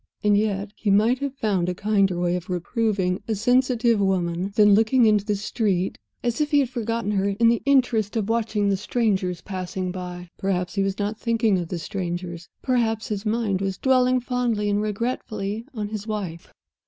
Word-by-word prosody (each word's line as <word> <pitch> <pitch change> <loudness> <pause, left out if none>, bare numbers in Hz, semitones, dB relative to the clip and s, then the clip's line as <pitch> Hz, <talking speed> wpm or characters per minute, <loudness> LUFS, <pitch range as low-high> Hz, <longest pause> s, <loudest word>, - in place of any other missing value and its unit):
And 210 -1 +4
yet, 205 -1 0
he 215 - -2
might 220 +6 +4
have 280 -1 -3
found 195 -8 0
a 180 - -2
kinder 200 -2 +1
way 175 0 +1
of 180 0 -5
reproving 190 0 -1
a 220 - 0
sensitive 240 0 +2
woman 185 -1 0
than 210 -1 +6
looking 225 +4 +4
into 210 -2 +4
the 210 0 0
street 200 -2 -1 0.2
as 240 +3 0
if 300 - +1
he 295 - +3
had 260 -2 -2
forgotten 230 -3 -2
her 200 -1 +1
in 230 -1 +6
the 235 - +2
interest 245 -7 +2
of 210 -3 -1
watching 220 -3 0
the 195 - +1
strangers 195 -4 0
passing 185 -1 -4
by! 180 -1 -7
Perhaps 180 -2 -1
he 195 - 0
was 195 0 -1
not 205 +1 -2
thinking 225 -4 +1
of 175 - -4
the 175 - -4
strangers; 175 0 -5
perhaps 230 -3 0
his 210 0 -3
mind 210 -4 0
was 195 -1 -2
dwelling 255 -1 +3
fondly 240 -4 -1
and 205 +1 +1
regretfully 215 -1 -3
on 210 -2 -3
his 215 0 -5
wife? 190 -6 -5
210 Hz, 190 wpm, -24 LUFS, 190-230 Hz, 0.2 s, than